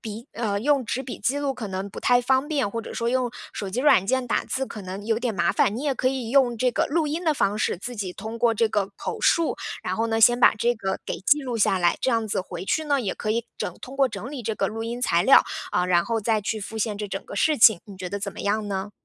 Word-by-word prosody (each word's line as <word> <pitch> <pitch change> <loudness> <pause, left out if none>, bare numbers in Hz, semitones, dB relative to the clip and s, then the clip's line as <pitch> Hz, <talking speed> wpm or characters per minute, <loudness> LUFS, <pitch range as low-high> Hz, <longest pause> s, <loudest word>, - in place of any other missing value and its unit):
笔 220 +1 -7
呃， 210 -3 -1
用 280 0 +2
纸 250 - -2
笔 260 -2 -6
记 280 +3 0
录 280 -2 -1
可 220 -5 -6
能 190 +1 -4
不 - - -9
太 245 0 +4
方 265 +4 +1
便， 280 -9 0
或 230 +2 -4
者 - - -8
说 235 0 -2
用 250 -1 0 0.2
手 200 -2 -5
机 230 - -4
软 275 -10 +5
件 255 +3 0
打 - - 0
字 265 0 -2
可 210 - -8
能 190 +2 -7
有 225 -1 +1
点 235 -1 -1
麻 175 -3 +1
烦， 210 - +2
你 275 - -4
也 280 - +1
可 255 +1 +1
以 255 -4 -3
用 250 -4 +3
这 250 0 +2
个 - - +1
录 315 +1 +1
音 320 +4 -2
的 315 - +3
方 210 -7 0
式， 215 - 0
自 245 +7 -7
己 195 -5 -4
通 220 +4 -7
过 230 0 +3
这 225 0 +1
个 205 -2 -1
口 - - -5
述， 335 -1 +2 0.2
然 - - -3
后 225 +1 0
呢， 225 0 0
先 240 +2 +6
把 - - +6
这 240 +3 +1
个 195 -3 -3
给 - - -4
记 295 +9 +3
录 250 -4 -3
下 195 -3 +2
来， 175 -1 +2
这 260 - +1
样 225 -2 +1
子 200 - -1
回 180 0 -7
去 315 - 0
呢， 285 -2 +1
也 205 -6 -2
可 215 - -3
以 230 +2 -1
整 - - -3
通 255 - -9
过 270 -2 +3
整 210 +3 -7
理 275 -4 -6
这 220 0 -3
个 - - +1
录 225 +1 -4
音 235 +2 -4
材 175 -8 +2
料， 270 - +7 0.3
啊， 180 0 +1
然 175 -1 +3
后 230 -1 -1
再 220 0 +1
去 215 +2 -2
复 220 +2 -7
现 210 -1 -2
这 210 - -3
整 195 0 -5
个 - - -9
事 310 -2 +2
情， 220 -5 +7
你 200 -2 -12
觉 185 -1 -5
得 200 - -3
怎 200 0 -4
么 - - -8
样 210 +1 -1
呢？ 195 +1 -4
225 Hz, 315 characters per minute, -24 LUFS, 200-255 Hz, 0.3 s, 料